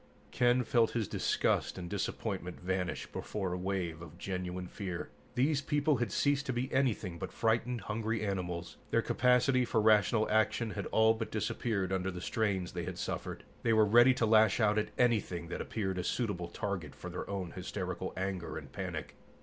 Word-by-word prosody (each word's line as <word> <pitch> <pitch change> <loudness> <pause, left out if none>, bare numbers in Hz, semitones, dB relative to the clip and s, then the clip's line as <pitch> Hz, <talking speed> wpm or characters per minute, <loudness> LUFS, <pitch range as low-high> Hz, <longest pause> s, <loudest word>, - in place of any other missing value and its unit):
Ken 125 0 +3
felt 115 0 +2
his 115 -4 0
disgust - - 0
and 90 -1 -5
disappointment 95 -1 -3
vanish 90 0 -2
before 95 -4 -4
a - - -2
wave 90 -3 -2
of 85 0 -10
genuine 90 0 -4
fear. 90 -1 -5 0.3
These 140 +3 +2
people 145 0 +2
had 120 -4 -1
ceased 140 +4 +1
to 130 - 0
be 125 +2 -2
anything 110 -10 0
but - - -4
frightened, 115 +1 0
hungry 110 +1 -2
animals. 90 -3 -3
Their - - +2
capacity 125 +1 +3
for 115 -2 +1
rational 110 0 +4
action 110 +1 +2
had 100 -2 -4
all 110 0 +4
but 115 0 -4
disappeared 100 -3 -1
under 95 0 0
the 90 -1 -5
strains 100 -2 -1
they - - -4
had - - -5
suffered. - - -4 0.2
They 115 - +2
were 110 -1 +6
ready 120 +5 +6
to 120 - +2
lash 110 -1 +5
out 105 -1 +4
at 105 - -2
anything 100 -8 +1
that - - -3
appeared 95 -4 -2
a - - -1
suitable 100 -6 -1
target 90 -4 -4
for - - -7
their - - -5
own 95 -3 -3
hysterical 95 -1 -4
anger 95 -2 -3
and - - -9
panic. - - -5
105 Hz, 180 wpm, -32 LUFS, 90-115 Hz, 0.3 s, were